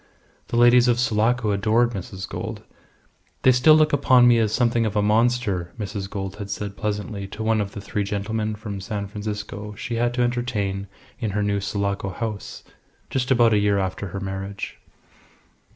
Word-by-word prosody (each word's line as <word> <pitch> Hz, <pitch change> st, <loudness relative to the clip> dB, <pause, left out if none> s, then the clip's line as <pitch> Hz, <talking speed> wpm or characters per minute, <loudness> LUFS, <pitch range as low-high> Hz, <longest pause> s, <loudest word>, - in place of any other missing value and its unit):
The 120 Hz, -, -2 dB
ladies 120 Hz, +1 st, +6 dB
of 120 Hz, -1 st, +3 dB
Sulaco 115 Hz, 0 st, +2 dB
adored 110 Hz, +4 st, +2 dB
Mrs. 95 Hz, -2 st, -6 dB
Gould. -, -, -6 dB, 0.8 s
"They 130 Hz, -, +7 dB
still 130 Hz, +5 st, +6 dB
look 155 Hz, -1 st, +3 dB
upon 130 Hz, -3 st, +5 dB
me 120 Hz, -1 st, +5 dB
as 110 Hz, -2 st, +1 dB
something 120 Hz, 0 st, +2 dB
of 105 Hz, -, -4 dB
a 105 Hz, -, +3 dB
monster," 105 Hz, -5 st, +1 dB
Mrs. 100 Hz, -2 st, -4 dB
Gould 95 Hz, -1 st, -5 dB
had 100 Hz, -1 st, -6 dB
said 100 Hz, 0 st, -4 dB
pleasantly 105 Hz, -1 st, -3 dB
to 105 Hz, +3 st, -6 dB
one 110 Hz, -1 st, +2 dB
of 100 Hz, 0 st, -4 dB
the 100 Hz, -, -6 dB
three 105 Hz, +1 st, -2 dB
gentlemen 105 Hz, +2 st, -2 dB
from 105 Hz, -2 st, -6 dB
San 100 Hz, +1 st, -4 dB
Francisco 105 Hz, 0 st, -6 dB
she 120 Hz, 0 st, -4 dB
had 120 Hz, +1 st, +1 dB
to 125 Hz, -, +2 dB
entertain 110 Hz, -5 st, -1 dB, 0.3 s
in 110 Hz, -, -1 dB
her 105 Hz, -, +1 dB
new 100 Hz, 0 st, 0 dB
Sulaco 100 Hz, 0 st, -2 dB
house 105 Hz, +1 st, -5 dB, 0.5 s
just 130 Hz, 0 st, -1 dB
about 120 Hz, -3 st, +5 dB
a 105 Hz, -, +4 dB
year 100 Hz, -1 st, +2 dB
after 95 Hz, +1 st, -2 dB
her 100 Hz, +2 st, -5 dB
marriage. 95 Hz, +1 st, -5 dB
105 Hz, 180 wpm, -23 LUFS, 100-120 Hz, 0.8 s, They